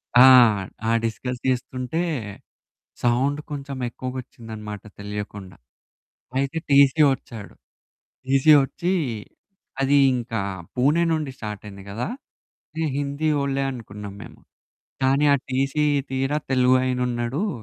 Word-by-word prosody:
ఆ! 125 Hz, +2 st, +9 dB, 0.6 s
ఆ -, -, +3 dB
discuss 125 Hz, +2 st, -3 dB
జేస్తుంటే, 130 Hz, +4 st, -1 dB, 1.0 s
sound 130 Hz, +5 st, +2 dB
కొంచెం 140 Hz, -1 st, -5 dB
ఎక్కువగొచ్చిందన్నమాట 115 Hz, -5 st, -7 dB, 0.2 s
తెలియకుండా. 100 Hz, -3 st, -7 dB, 0.8 s
అయితే 140 Hz, +4 st, -1 dB
టీసీ 140 Hz, +2 st, +5 dB
వచ్చాడు. 115 Hz, -5 st, -9 dB, 0.7 s
టీసీ 135 Hz, +3 st, +4 dB
వచ్చి, 175 Hz, +7 st, -2 dB, 0.9 s
అది 140 Hz, +1 st, +4 dB, 0.2 s
ఇంకా 115 Hz, -3 st, -3 dB, 0.3 s
పూణే 145 Hz, +7 st, +3 dB
నుండి 155 Hz, -4 st, -2 dB
స్టార్టైయింది 105 Hz, -2 st, -8 dB
కదా! 115 Hz, +5 st, -3 dB, 0.8 s
ఈ -, -, +1 dB
హిందీ 145 Hz, +2 st, -1 dB
వోళ్ళే 140 Hz, 0 st, 0 dB
అనుకున్నాం 105 Hz, -4 st, -8 dB
మేము. -, -, -12 dB, 0.6 s
కానీ, 135 Hz, +3 st, +3 dB
ఆ -, -, +4 dB
టీసీ 135 Hz, +3 st, +1 dB, 0.3 s
తీరా 135 Hz, +3 st, 0 dB
తెలుగు 130 Hz, 0 st, +4 dB
అయినున్నాడు. 125 Hz, -, -1 dB
130 Hz, 100 wpm, -23 LUFS, 115-140 Hz, 1.0 s, ఆ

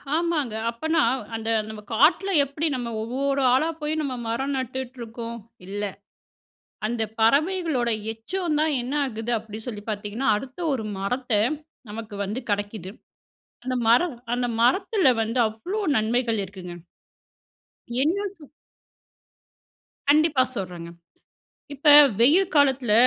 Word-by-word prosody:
ஆமாங்க. 320 Hz, -8 st, 0 dB, 0.2 s
அப்பனா, 315 Hz, +7 st, 0 dB, 0.4 s
அந்த 225 Hz, 0 st, -4 dB, 0.2 s
நம்ம 215 Hz, -1 st, -8 dB
காட்ல 330 Hz, -, +4 dB
எப்டி 280 Hz, +4 st, -2 dB
நம்ம 240 Hz, -2 st, -4 dB
ஒவ்வோரு 275 Hz, +4 st, -1 dB
ஆளா 310 Hz, +6 st, +3 dB
போய், 300 Hz, +1 st, -1 dB
நம்ம 280 Hz, -4 st, -2 dB
மரம் 265 Hz, +5 st, -1 dB
நட்டுட்டு 260 Hz, 0 st, -4 dB
இருக்கோம், 230 Hz, 0 st, -6 dB, 0.3 s
இல்ல. 205 Hz, +2 st, -4 dB, 1.0 s
அந்த 230 Hz, +1 st, -2 dB, 0.2 s
பறவைகளோட 285 Hz, +1 st, +2 dB, 0.2 s
எச்சந்தான் 310 Hz, +5 st, -1 dB
என்ன 255 Hz, +4 st, -4 dB
ஆகுது 230 Hz, -2 st, -3 dB
அப்டி 215 Hz, -1 st, -9 dB
சொல்லி 215 Hz, -4 st, -5 dB
பார்த்தீங்கனா, 210 Hz, +5 st, -3 dB
அடுத்த 260 Hz, +7 st, -8 dB
ஒரு 245 Hz, -5 st, -2 dB
மரத்த 250 Hz, +6 st, -2 dB, 0.6 s
நமக்கு 220 Hz, 0 st, -7 dB
வந்து 210 Hz, +6 st, -3 dB
கெடைக்குது. 205 Hz, -2 st, -3 dB, 0.8 s
அந்த 255 Hz, 0 st, -1 dB
மர 235 Hz, +2 st, +6 dB, 0.3 s
அந்த 245 Hz, 0 st, 0 dB
மரத்தில 375 Hz, -, +3 dB
வந்து 225 Hz, +3 st, -1 dB
அவ்ளோ 345 Hz, -, -5 dB, 0.2 s
நன்மைகள் 230 Hz, +1 st, +1 dB
இருக்குங்க. 180 Hz, -2 st, -9 dB, 1.3 s
என்ன 345 Hz, +8 st, +1 dB
கு 320 Hz, -, -15 dB, 1.7 s
கண்டிப்பா 300 Hz, -2 st, +4 dB
சொல்றேங்க. 175 Hz, -4 st, -5 dB, 0.9 s
இப்ப 285 Hz, +2 st, 0 dB, 0.3 s
வெயில் 335 Hz, +10 st, +5 dB
காலத்தில, 270 Hz, -5 st, +3 dB
250 Hz, 115 wpm, -24 LUFS, 220-295 Hz, 1.7 s, மர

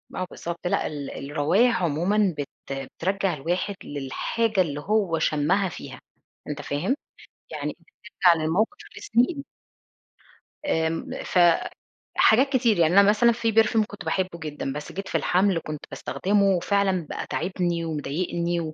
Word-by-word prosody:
آه 185 Hz, -, -2 dB
بالضبط، 170 Hz, +1 st, -5 dB
لأ، -, -, 0 dB
ال 145 Hz, -2 st, -6 dB
الروايح 175 Hz, -, +2 dB
عمومًا 180 Hz, +4 st, +1 dB
بت 145 Hz, -, -4 dB, 0.2 s
بترجّع 185 Hz, +8 st, -2 dB
الواحد 175 Hz, +7 st, -2 dB
للحاجة 185 Hz, -, -1 dB
اللي 145 Hz, -4 st, -2 dB
هو 190 Hz, -2 st, +1 dB
شمها 170 Hz, +6 st, +1 dB
فيها، -, -, -9 dB, 0.5 s
أنت 150 Hz, 0 st, -4 dB
فاهم؟ 170 Hz, -, -1 dB, 0.6 s
يعني -, -, -4 dB, 0.5 s
ترجع 170 Hz, -3 st, +6 dB
للموقف 175 Hz, +8 st, 0 dB, 0.2 s
لسنين. 265 Hz, +5 st, +1 dB, 1.2 s
آمم، 160 Hz, -, -1 dB
فحاجات 220 Hz, +7 st, +2 dB
كتير، 235 Hz, -6 st, +3 dB
يعني 165 Hz, +1 st, +4 dB
أنا 200 Hz, 0 st, +6 dB
مثلًا 235 Hz, +3 st, +5 dB
فيه 230 Hz, -1 st, -1 dB
perfume 225 Hz, 0 st, +4 dB
كنت 205 Hz, -, -10 dB
باحبه 185 Hz, -3 st, -1 dB
جدًا، 150 Hz, -3 st, -4 dB
بس 150 Hz, 0 st, -6 dB
جيت 195 Hz, +1 st, -6 dB
في -, -, 0 dB
الحمل 185 Hz, -1 st, +2 dB
كنت 150 Hz, -1 st, -6 dB
باستخدمه، 200 Hz, +1 st, 0 dB
وفعلًا 190 Hz, -1 st, +1 dB
بقى -, -, -4 dB
تاعبني 175 Hz, -1 st, -1 dB
ومضايقني 170 Hz, +3 st, -2 dB
180 Hz, 130 wpm, -25 LUFS, 155-205 Hz, 1.2 s, ترجع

